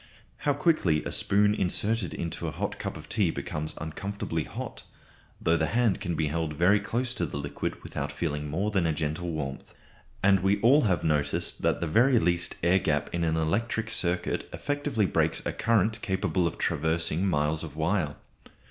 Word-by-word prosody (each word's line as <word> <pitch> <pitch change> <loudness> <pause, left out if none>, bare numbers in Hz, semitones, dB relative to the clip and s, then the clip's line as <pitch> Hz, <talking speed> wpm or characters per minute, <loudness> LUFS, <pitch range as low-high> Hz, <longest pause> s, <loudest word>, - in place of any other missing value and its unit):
How 145 - +1
quickly 140 - +2
a - - -3
spoon 105 +1 +3
inserted 105 +1 0
into 85 - -4
a - - -2
hot - - -4
cup - - -4
of - - -11
tea - - +1
becomes 75 0 -4
uncomfortably 80 0 -4
hot, - - -7 0.6
though 85 +1 +2
the 80 - +1
hand 115 -6 +2
can 85 -3 -2
be 80 - 0
held 80 +1 -1
very 90 +7 +4
close 120 +5 -1
to 90 - -1
the 70 - -5
liquid 70 0 -4
without - - -4
feeling 75 -3 -3
more 95 +8 -1
than 95 -5 +2
a 80 - +1
gentle 80 +3 -2
warmth. 75 -4 -5 0.5
And 100 0 +5
we 95 +2 +2
all 135 +5 +5
have 95 -4 +1
noticed 75 -2 0
that - - +1
the - - +1
very 120 - +4
least 85 -3 +2
air 90 +3 +4
gap 75 -4 0
in 85 0 0
an 80 -1 +1
electric 115 +8 0
circuit 90 -4 -1
effectively 145 -7 -1
breaks 85 - 0
a - - -1
current 110 0 +1
capable 95 -2 0
of - - -5
traversing 80 +4 0
miles 75 -1 +1
of 75 -3 -8
wire. 80 -1 0
85 Hz, 185 wpm, -28 LUFS, 80-105 Hz, 0.6 s, And